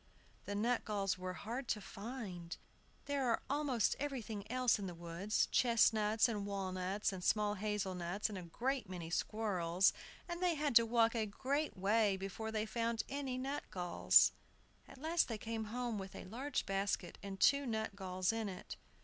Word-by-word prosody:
The 205 Hz, -, -3 dB
nutgalls 205 Hz, -4 st, 0 dB
were 185 Hz, 0 st, -3 dB
hard 235 Hz, +9 st, -5 dB
to 215 Hz, -, 0 dB
find. 200 Hz, -5 st, -6 dB, 0.5 s
There 280 Hz, -3 st, 0 dB
was 230 Hz, -, +2 dB
almost 280 Hz, -7 st, +2 dB
everything 235 Hz, -8 st, -4 dB
else 250 Hz, -3 st, +3 dB
in 195 Hz, -, -3 dB
the 175 Hz, -, -6 dB
woods, 170 Hz, +5 st, 0 dB
chestnuts, 225 Hz, -2 st, +4 dB
and 205 Hz, -3 st, -2 dB
walnuts, 195 Hz, +1 st, -1 dB
and 185 Hz, -1 st, -6 dB
small 210 Hz, +1 st, +2 dB
hazel 210 Hz, -2 st, -2 dB
nuts, 180 Hz, +3 st, -2 dB
and 210 Hz, -, -6 dB
a 185 Hz, -, -4 dB
great 240 Hz, +7 st, -2 dB
many 170 Hz, -3 st, -6 dB
squirrels; 185 Hz, -3 st, +2 dB, 0.3 s
and 345 Hz, 0 st, -4 dB
they 355 Hz, -2 st, +3 dB
had 290 Hz, -4 st, 0 dB
to 230 Hz, 0 st, +5 dB
walk 230 Hz, 0 st, +4 dB
a 225 Hz, -2 st, 0 dB
great 275 Hz, +8 st, -1 dB
way 205 Hz, +1 st, +3 dB
before 195 Hz, +3 st, -4 dB
they 215 Hz, -1 st, 0 dB
found 230 Hz, 0 st, -1 dB
any 270 Hz, -2 st, -3 dB
nutgalls. 255 Hz, -10 st, +3 dB, 0.6 s
At -, -, -13 dB
last 320 Hz, +5 st, +2 dB
they 225 Hz, -, -3 dB
came 225 Hz, 0 st, -4 dB
home 235 Hz, 0 st, -2 dB
with 190 Hz, 0 st, -7 dB
a -, -, -7 dB
large 255 Hz, +9 st, -2 dB
basket 195 Hz, -2 st, -1 dB
and 195 Hz, -1 st, -6 dB
two 280 Hz, -1 st, +5 dB
nutgalls 195 Hz, -4 st, -1 dB
in 225 Hz, -2 st, -2 dB
it. 185 Hz, -, -7 dB
215 Hz, 165 wpm, -37 LUFS, 195-245 Hz, 0.6 s, to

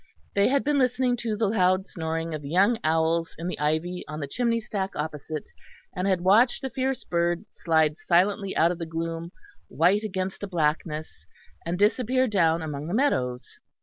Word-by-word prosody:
They 200 Hz, 0 st, +4 dB
had 275 Hz, +1 st, +2 dB
been 290 Hz, 0 st, +2 dB
listening 250 Hz, -1 st, +2 dB
to 225 Hz, -2 st, -2 dB
the 220 Hz, -, +1 dB
loud 190 Hz, -2 st, +2 dB
snoring 165 Hz, -2 st, -4 dB
of 155 Hz, -, -4 dB
the 140 Hz, -, -7 dB
young 200 Hz, +8 st, +3 dB
owls 160 Hz, +1 st, +1 dB
in 165 Hz, -, -6 dB
the 180 Hz, -, -4 dB
ivy 160 Hz, +4 st, -1 dB
on 155 Hz, 0 st, -6 dB
the 145 Hz, -, -3 dB
chimney 230 Hz, -, 0 dB
stack 200 Hz, -3 st, -4 dB
opposite, 150 Hz, 0 st, -5 dB, 0.4 s
and 180 Hz, +2 st, -1 dB
had 185 Hz, -3 st, +1 dB
watched 215 Hz, +9 st, +4 dB
the 265 Hz, -, -3 dB
fierce 265 Hz, 0 st, -2 dB
bird 175 Hz, +2 st, 0 dB
slide 160 Hz, -2 st, +1 dB
silently 195 Hz, +3 st, +1 dB
out 165 Hz, +2 st, +4 dB
of 175 Hz, -, -5 dB
the 165 Hz, -, -4 dB
gloom, 165 Hz, +1 st, -4 dB, 0.4 s
white 180 Hz, +6 st, +3 dB
against 190 Hz, -3 st, -4 dB
the 200 Hz, -, -4 dB
blackness, 155 Hz, -2 st, -2 dB, 0.4 s
and 175 Hz, +1 st, -1 dB
disappear 250 Hz, +5 st, +2 dB
down 165 Hz, -6 st, +2 dB
among 150 Hz, -1 st, -5 dB
the 175 Hz, -, -2 dB
meadows. 125 Hz, -, -1 dB
180 Hz, 180 wpm, -26 LUFS, 160-210 Hz, 0.4 s, They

